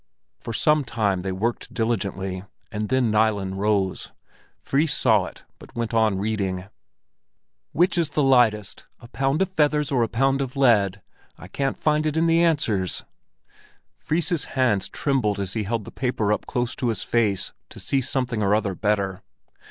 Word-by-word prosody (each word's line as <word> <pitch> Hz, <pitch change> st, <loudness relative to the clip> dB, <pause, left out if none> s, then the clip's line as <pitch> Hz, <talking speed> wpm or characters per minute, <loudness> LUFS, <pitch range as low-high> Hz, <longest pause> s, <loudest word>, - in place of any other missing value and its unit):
For -, -, -6 dB
some 150 Hz, +6 st, +2 dB
time 105 Hz, -7 st, -1 dB
they 95 Hz, +1 st, -3 dB
worked 110 Hz, +6 st, -3 dB
diligently, 95 Hz, -5 st, -2 dB, 0.3 s
and 105 Hz, 0 st, -3 dB
then 130 Hz, -3 st, +2 dB
Nilen 105 Hz, -3 st, +1 dB
rose. 100 Hz, -2 st, 0 dB, 0.5 s
Fris 145 Hz, +3 st, +1 dB
saw -, -, +3 dB
it, -, -, -12 dB
but -, -, -15 dB
went 115 Hz, -1 st, -3 dB
on 110 Hz, -3 st, +2 dB
reading. 95 Hz, -3 st, -2 dB, 1.1 s
"Which 180 Hz, +2 st, +2 dB
is 165 Hz, -3 st, +1 dB
the 145 Hz, 0 st, 0 dB
lightest, 120 Hz, -6 st, +2 dB
a 120 Hz, -, -13 dB
pound 135 Hz, +7 st, +1 dB
of 190 Hz, -, -4 dB
feathers 150 Hz, -3 st, +1 dB
or 130 Hz, -3 st, +2 dB
a 115 Hz, -, +2 dB
pound 135 Hz, +4 st, +1 dB
of 130 Hz, -1 st, -4 dB
lead? 105 Hz, -7 st, +3 dB, 0.3 s
I -, -, -11 dB
can't 135 Hz, +7 st, -2 dB
find 155 Hz, 0 st, +1 dB
it 155 Hz, +1 st, -1 dB
in 165 Hz, -, +3 dB
the 165 Hz, 0 st, +4 dB
answers." 110 Hz, -, +1 dB, 0.9 s
Fris's 160 Hz, 0 st, -1 dB
hands 115 Hz, -7 st, +2 dB
trembled 115 Hz, -8 st, 0 dB
as 95 Hz, -1 st, -3 dB
he 110 Hz, -2 st, -2 dB
held 110 Hz, 0 st, -2 dB
the 115 Hz, -, -9 dB
paper 115 Hz, -5 st, 0 dB
up -, -, -4 dB
close 120 Hz, -1 st, -2 dB
to 125 Hz, -, -1 dB
his 110 Hz, -5 st, -1 dB
face 105 Hz, -5 st, 0 dB, 0.2 s
to -, -, -11 dB
see 135 Hz, -, 0 dB
something 125 Hz, -3 st, -1 dB
or 100 Hz, 0 st, +3 dB
other 105 Hz, -3 st, 0 dB
better. 100 Hz, -1 st, -1 dB
115 Hz, 170 wpm, -24 LUFS, 100-135 Hz, 1.1 s, the